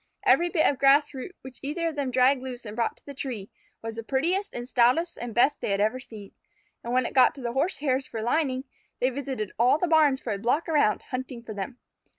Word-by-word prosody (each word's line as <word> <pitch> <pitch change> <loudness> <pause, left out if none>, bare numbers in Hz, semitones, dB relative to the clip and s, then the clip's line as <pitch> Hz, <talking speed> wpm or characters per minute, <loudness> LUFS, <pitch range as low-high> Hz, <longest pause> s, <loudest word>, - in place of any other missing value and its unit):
Every 350 +1 +4
bit 325 -3 +2
of 275 - +2
grass 280 +2 +4
root 270 +8 -7
which 260 -1 -10
either 330 +4 -2
of 315 - -8
them 280 -3 -1
dragged 255 +1 +3
loose 255 -2 -7
and 210 0 -7
brought 235 -1 -1
to - - -18
the 280 - -8
tree, 245 -7 -5 0.3
was 225 0 -6
the 230 - -4
prettiest 345 - 0
and 240 0 -6
stoutest 255 +8 +2
and 240 0 -6
best 260 +5 +3
they - - -2
had 200 0 0
ever 220 +5 +1
seen. 215 -5 -11 0.5
And 235 - -4
when 255 0 +2
it - - -4
got 260 - +5
to 275 - -10
the 235 -1 -3
Horsehairs 275 -2 0
for 220 -1 -5
lining, 260 +1 0 0.4
they 255 +1 +2
visited 260 -6 -4
all 250 +5 +5
the 360 - 0
barns 305 -5 +4
for 230 - -3
a 200 - -4
block 245 +9 0
around, 295 -10 +2
hunting 255 -2 -5
for 225 - -7
them. 205 +5 -6
260 Hz, 235 wpm, -26 LUFS, 235-285 Hz, 0.5 s, got